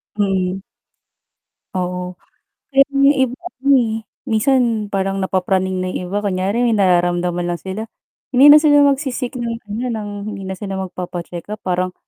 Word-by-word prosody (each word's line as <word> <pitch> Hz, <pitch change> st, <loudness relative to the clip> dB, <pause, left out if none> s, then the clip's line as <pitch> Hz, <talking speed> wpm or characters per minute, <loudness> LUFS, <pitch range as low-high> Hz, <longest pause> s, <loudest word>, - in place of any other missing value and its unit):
Mm. 195 Hz, -2 st, 0 dB, 1.1 s
Oo, 180 Hz, 0 st, -3 dB, 0.6 s
kaya 275 Hz, -, +8 dB
yung 275 Hz, +1 st, +4 dB
iba 260 Hz, -2 st, 0 dB, 0.2 s
rin, 280 Hz, -, +2 dB
eh, 225 Hz, -3 st, 0 dB, 0.3 s
minsan 225 Hz, -2 st, +1 dB
parang 195 Hz, 0 st, -1 dB
napapraning 190 Hz, 0 st, 0 dB
na 185 Hz, -, -2 dB
yung 180 Hz, -1 st, -5 dB
iba. 205 Hz, -, 0 dB
Kunyari 200 Hz, +3 st, 0 dB
may 230 Hz, -, +2 dB
nararamdaman 175 Hz, -2 st, +1 dB
lang 175 Hz, -1 st, -3 dB
sila, 190 Hz, +3 st, -5 dB, 0.5 s
hindi 275 Hz, +4 st, +8 dB
na 300 Hz, -, +10 dB
sila 295 Hz, -1 st, +5 dB
magsi-seek 265 Hz, -2 st, -3 dB
ng 235 Hz, -1 st, -2 dB, 0.2 s
ano, 215 Hz, +4 st, -3 dB
ng 215 Hz, -2 st, -4 dB, 0.2 s
hindi 195 Hz, -1 st, -7 dB
na 190 Hz, -1 st, -6 dB
sila 195 Hz, -1 st, -5 dB
magpapa-check 175 Hz, -2 st, -6 dB
up 215 Hz, -, -14 dB
parang, 185 Hz, 0 st, -1 dB
195 Hz, 155 wpm, -19 LUFS, 185-240 Hz, 1.1 s, na